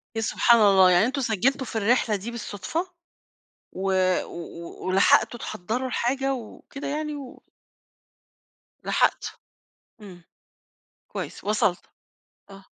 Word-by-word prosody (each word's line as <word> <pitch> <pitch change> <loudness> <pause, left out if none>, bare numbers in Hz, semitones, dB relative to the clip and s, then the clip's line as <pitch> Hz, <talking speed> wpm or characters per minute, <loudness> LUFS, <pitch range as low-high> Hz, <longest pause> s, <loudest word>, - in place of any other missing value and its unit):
يا 225 - -1
سبحان 235 +2 +4
الله، 190 -3 +6
يعني 180 +4 +5
أنتم 265 +3 -2
سجّلتوا 250 +4 0
في - - -8
الرحلة 220 0 +2
دي 210 +5 -5
بالصدفة، 235 - -4 0.9
و 190 +1 -2 0.3
و 170 0 -9
ولحقتوا 195 +5 +3
تحضّروا 225 +8 -3
الحاجة، 270 +2 0
وكده 255 +4 -8
يعني، 300 +1 -3
و 275 -3 -10 1.4
لحقت، - - 0 0.6
إمم، 185 -4 -12 0.9
كويس - - -7
وصلتوا، 205 -3 0 0.6
آه. 195 0 -13
220 Hz, 110 wpm, -25 LUFS, 195-260 Hz, 1.4 s, الله